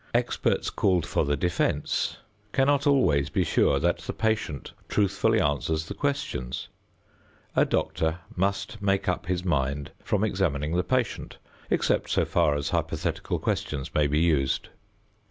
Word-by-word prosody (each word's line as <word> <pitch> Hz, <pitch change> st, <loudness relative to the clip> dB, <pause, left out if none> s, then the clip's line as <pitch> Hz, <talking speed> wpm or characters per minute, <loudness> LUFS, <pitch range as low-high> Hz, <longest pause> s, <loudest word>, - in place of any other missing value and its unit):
Experts -, -, +1 dB
called 90 Hz, -4 st, +2 dB
for -, -, 0 dB
the 70 Hz, 0 st, 0 dB
defense 85 Hz, +3 st, 0 dB, 0.4 s
cannot 140 Hz, +2 st, +3 dB
always 75 Hz, -, +3 dB
be 95 Hz, -4 st, +1 dB
sure 80 Hz, -, +3 dB
that -, -, +1 dB
the -, -, -5 dB
patient 110 Hz, -, -1 dB, 0.2 s
truthfully 100 Hz, -2 st, +2 dB
answers 80 Hz, +2 st, 0 dB
the -, -, -6 dB
questions. 140 Hz, -, -3 dB, 0.9 s
A -, -, +5 dB
doctor 80 Hz, +1 st, 0 dB, 0.2 s
must 100 Hz, +3 st, -1 dB
make 100 Hz, -1 st, +1 dB
up 90 Hz, -1 st, -1 dB
his 90 Hz, 0 st, -1 dB
mind 70 Hz, -3 st, 0 dB
from 105 Hz, 0 st, 0 dB
examining 85 Hz, -7 st, 0 dB
the 90 Hz, -, +2 dB
patient, 125 Hz, +2 st, -1 dB, 0.3 s
except -, -, +1 dB
so -, -, +2 dB
far 80 Hz, -4 st, +2 dB
as 70 Hz, -1 st, -2 dB
hypothetical -, -, -1 dB
questions 70 Hz, -3 st, -2 dB
may 75 Hz, -1 st, +3 dB
be 75 Hz, +1 st, 0 dB
used. 75 Hz, -5 st, +1 dB
85 Hz, 140 wpm, -27 LUFS, 75-100 Hz, 0.9 s, A